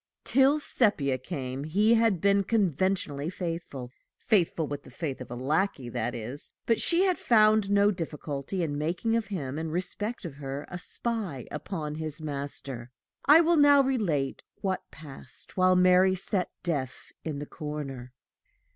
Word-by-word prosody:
Till 275 +3 +4
Sepia 155 - +1
came, 130 -2 -5
he 205 +9 +3
had 225 -5 +3
been 200 0 +4
conventionally 185 -7 0
faithful 165 -8 -5 0.3
faithful 175 -6 +2
with 145 0 -5
the - - -15
faith 135 0 -5
of 125 - -8
a 120 - -5
lackey, 140 +1 -1
that 120 0 -2
is 120 +5 -7
but 230 - +2
she 345 +2 +4
had 370 -2 +1
found 215 -3 +4
no 205 0 +4
difficulty 160 -1 -4
in 145 -3 -2
making 180 +9 0
of 230 -1 0
him, 150 -8 -4
in 160 0 -3
respect 185 +7 -3
of 145 -5 -7
her, 140 0 -5
a 180 - -5
spy 195 - -4
upon 155 -6 -4
his 155 -1 -5
master. 140 -4 -5 0.4
I 300 +4 +8
will 340 0 +3
now 285 -1 +7
relate 180 - 0 0.2
what 190 -1 -2
passed 140 -5 -5
while 185 0 +4
Mary 185 +1 +5
sat 185 -1 -1
deaf 140 -7 -3
in 155 -3 -4
the 145 - -5
corner. 145 -5 -6
165 Hz, 155 wpm, -28 LUFS, 140-205 Hz, 0.4 s, I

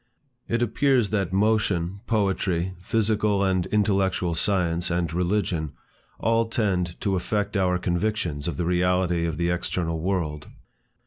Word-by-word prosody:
It 115 +1 +1
appears 120 -2 +2
that 100 -4 0
motion, 100 -3 +1
poetry, 95 -4 0
physical 105 0 +1
and 95 -2 +1
intellectual 95 -4 +1
science, 85 -1 +1
and 85 -2 -1
religion, 90 -4 -1 0.4
all 115 0 +1
tend 95 -6 -1
to 100 -2 0
affect 105 +3 -1
our 90 -2 +2
convictions 90 -4 -1
of 85 - -3
the 90 - -1
reality 90 -1 +1
of 80 -2 -3
the 85 +1 +1
external 85 -2 -2
world. 80 -4 -2
95 Hz, 130 wpm, -25 LUFS, 85-105 Hz, 0.4 s, appears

